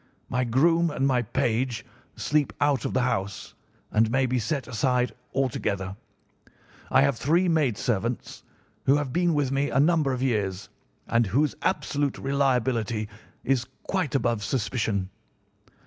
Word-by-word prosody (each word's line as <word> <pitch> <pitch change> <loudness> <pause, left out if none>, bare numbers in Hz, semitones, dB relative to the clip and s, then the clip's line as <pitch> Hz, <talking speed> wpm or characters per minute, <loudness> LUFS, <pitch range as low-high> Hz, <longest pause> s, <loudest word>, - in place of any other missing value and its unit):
My 125 +1 0
groom 165 +8 +3
and 135 -3 -1
my 130 -3 +3
page 120 +1 -1 0.3
sleep 150 -1 0
out 145 -5 +2
of - - -2
the 130 - +3
house, 100 -5 -2 0.4
and 110 +1 +3
may 130 +2 +2
be 125 0 0
set 140 +4 -2
aside 125 +1 +1 0.2
altogether. 100 -8 -1 0.9
I - - +5
have 140 -3 +2
three 170 +9 +2
maid 150 - +2
servants 115 +1 -2 0.5
who 135 - +6
have 145 -3 -2
been 175 -2 +2
with 140 -3 +1
me 140 +1 +1
a - - +1
number 155 -2 +3
of 130 0 -2
years 100 -6 -1 0.4
and 115 -1 +2
whose 140 +9 +2
absolute 145 -6 0
reliability 125 -6 0 0.3
is 130 -3 +1 0.2
quite 185 -10 -1
above 120 -4 +1
suspicion. 105 -4 -1
130 Hz, 145 wpm, -26 LUFS, 115-140 Hz, 0.9 s, who